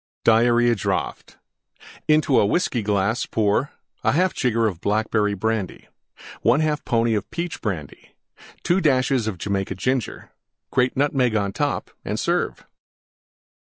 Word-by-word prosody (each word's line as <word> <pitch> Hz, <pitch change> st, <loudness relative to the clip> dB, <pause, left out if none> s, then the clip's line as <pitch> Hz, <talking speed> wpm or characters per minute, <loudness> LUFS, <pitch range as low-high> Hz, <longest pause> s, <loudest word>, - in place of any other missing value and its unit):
DIARRHEA 120 Hz, +1 st, +4 dB
DRAUGHT -, -, -3 dB, 0.7 s
Into 155 Hz, -3 st, +4 dB
a -, -, +4 dB
Whiskey 130 Hz, -, 0 dB
glass 105 Hz, +2 st, 0 dB
pour: 110 Hz, +5 st, 0 dB, 0.3 s
1/2 180 Hz, +5 st, +2 dB
jigger 115 Hz, -4 st, +1 dB
Blackberry 105 Hz, +3 st, 0 dB
Brandy. 110 Hz, -1 st, -3 dB, 0.5 s
1/2 150 Hz, -1 st, +2 dB
pony 115 Hz, -3 st, +2 dB
Peach 170 Hz, 0 st, -5 dB
Brandy. 90 Hz, -, -6 dB, 0.5 s
2 180 Hz, +2 st, +2 dB
dashes 130 Hz, -5 st, +2 dB
Jamaica 95 Hz, +1 st, -2 dB
Ginger. 125 Hz, +4 st, -2 dB, 0.4 s
Grate 125 Hz, +1 st, +1 dB
Nutmeg 135 Hz, -4 st, +1 dB
on 100 Hz, -2 st, 0 dB
top -, -, -2 dB
and 105 Hz, -, -3 dB
serve. 175 Hz, +1 st, -1 dB
115 Hz, 110 wpm, -22 LUFS, 105-135 Hz, 0.7 s, DIARRHEA